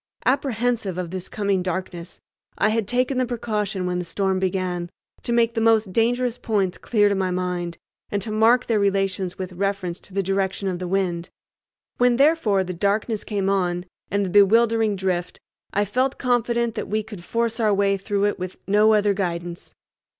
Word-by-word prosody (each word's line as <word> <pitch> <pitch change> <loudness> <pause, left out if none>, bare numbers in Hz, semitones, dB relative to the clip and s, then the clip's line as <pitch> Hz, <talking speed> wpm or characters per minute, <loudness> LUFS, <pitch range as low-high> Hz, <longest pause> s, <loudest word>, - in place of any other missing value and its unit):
Apprehensive 245 -7 0
of 180 -2 -4
this 185 -1 -6
coming 200 -3 0
darkness, 180 -1 -5 0.4
I 210 - +3
had 220 -2 0
taken 255 +3 +1
the 255 - +2
precaution, 210 -5 -2
when 180 0 -1
the - - -2
storm 190 +2 -1
began, 180 -2 -2 0.3
to - - -3
make 235 -1 +3
the 225 - -1
most 220 -4 +3
dangerous 240 +2 +1
points 200 -5 -1
clear 210 -3 +2
to 200 - +2
my 190 -1 0
mind, 180 -1 -2 0.3
and 205 - -1
to 220 - -4
mark 225 +3 +4
their 225 -3 +1
relations 195 -2 0
with 185 -1 -5
reference 195 -1 -2
to 195 - -11
the 195 - +1
direction 195 +1 -1
of 180 -2 -2
the 180 - -4
wind. 175 -2 -1 0.7
When, 245 0 +4
therefore, 270 -9 +3
the 185 0 -5
darkness 205 +4 0
came 200 -3 -2
on, 180 -2 0 0.2
and 200 +1 0
the 185 - -4
bewildering 220 +2 +4
drift, 185 -2 -2 0.3
I 205 +1 +1
felt 255 +6 0
confident 235 -2 +1
that - - -4
we 215 +1 0
could 205 -5 -10
force 230 +3 -1
our 215 -2 +3
way 200 0 +2
through 200 +1 -1
it 205 - -1
with 185 0 -5
no 210 +2 +4
other 205 -1 +3
guidance. 175 -3 -4
200 Hz, 185 wpm, -23 LUFS, 185-225 Hz, 0.7 s, mark